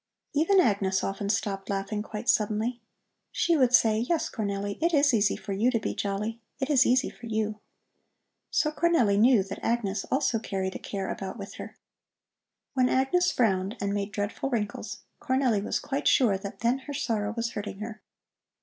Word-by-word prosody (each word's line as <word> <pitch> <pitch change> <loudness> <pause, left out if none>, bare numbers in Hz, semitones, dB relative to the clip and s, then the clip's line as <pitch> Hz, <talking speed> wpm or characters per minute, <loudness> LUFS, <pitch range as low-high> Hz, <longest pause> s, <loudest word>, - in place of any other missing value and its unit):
Even 330 +7 +4
Agnes 195 - +2
often 200 +1 -3
stopped 195 -1 -1
laughing 200 +1 -2
quite 215 +1 -7
suddenly. 220 +3 +1 0.5
She 340 - +2
would 255 -5 +4
say: 220 -3 +5
"Yes, 310 +8 0
Cornelli, 200 -2 -3
it 335 0 +2
is 285 -2 +4
easy 205 -3 +3
for 200 - -5
you 215 +6 +2
to 245 - +1
be - - -3
jolly. 210 +3 -3 0.2
It 275 +2 -1
is 275 -2 +5
easy 255 +1 +2
for 235 - -11
you." 215 -1 -2 0.9
So 305 - +1
Cornelli 295 -11 +3
knew 235 -2 +5
that 195 - -8
Agnes 210 -4 0
also 265 -4 +1
carried 190 -3 -3
a - - -6
care 195 -2 -4
about 190 +2 -5
with 200 -2 -8
her. - - -9 1.0
When 255 -2 +3
Agnes 310 +8 +2
frowned 200 -2 +1
and 200 0 -1
made 205 0 -2
dreadful 205 +6 -3
wrinkles, 215 -5 -3 0.2
Cornelli 260 -6 +1
was - - 0
quite 285 +1 -2
sure 235 -8 +4
that 195 +1 -7
then 240 +3 +2
her - - -3
sorrow 215 -6 -1
was 230 0 -1
hurting 205 -2 -5
her. 215 +2 -7
220 Hz, 175 wpm, -27 LUFS, 200-260 Hz, 1.0 s, say